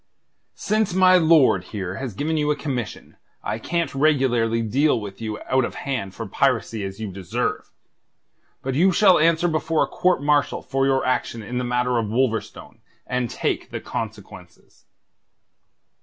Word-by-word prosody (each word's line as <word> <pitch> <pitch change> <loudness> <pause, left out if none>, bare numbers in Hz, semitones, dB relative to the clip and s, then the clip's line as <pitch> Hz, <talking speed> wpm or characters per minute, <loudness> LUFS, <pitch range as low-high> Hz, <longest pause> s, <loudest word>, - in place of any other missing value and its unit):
"Since 210 -3 0
my 185 -1 +6
lord 155 - +4
here 95 -2 -5
has 130 -7 -5
given 155 +7 -1
you 150 -1 0
a 150 - +2
commission, 135 -6 -5 0.3
I 110 - -3
can't 170 +7 -2
regularly 130 -6 +2
deal 135 +5 +2
with 100 0 -9
you 110 -1 -4
out 130 0 +1
of - - -4
hand 115 -9 -4
for - - -5
piracy 110 -3 0
as 95 +1 -6
you 110 -3 -5
deserve. 95 -2 -3 0.9
But 135 - -2
you 180 +8 +4
shall 185 -1 +5
answer 165 +2 +3
before 160 -1 +1
a - - -2
court 180 -5 +1
martial 145 -1 +1
for 135 0 0
your 135 -1 +1
action 120 -3 -1
in 125 +4 -4
the - - -2
matter 125 0 0
of 110 - -2
Wolverstone, 115 -2 -2 0.3
and 125 -2 -2
take - - -2
the - - -5
consequences." - - -8
130 Hz, 160 wpm, -23 LUFS, 115-155 Hz, 0.9 s, my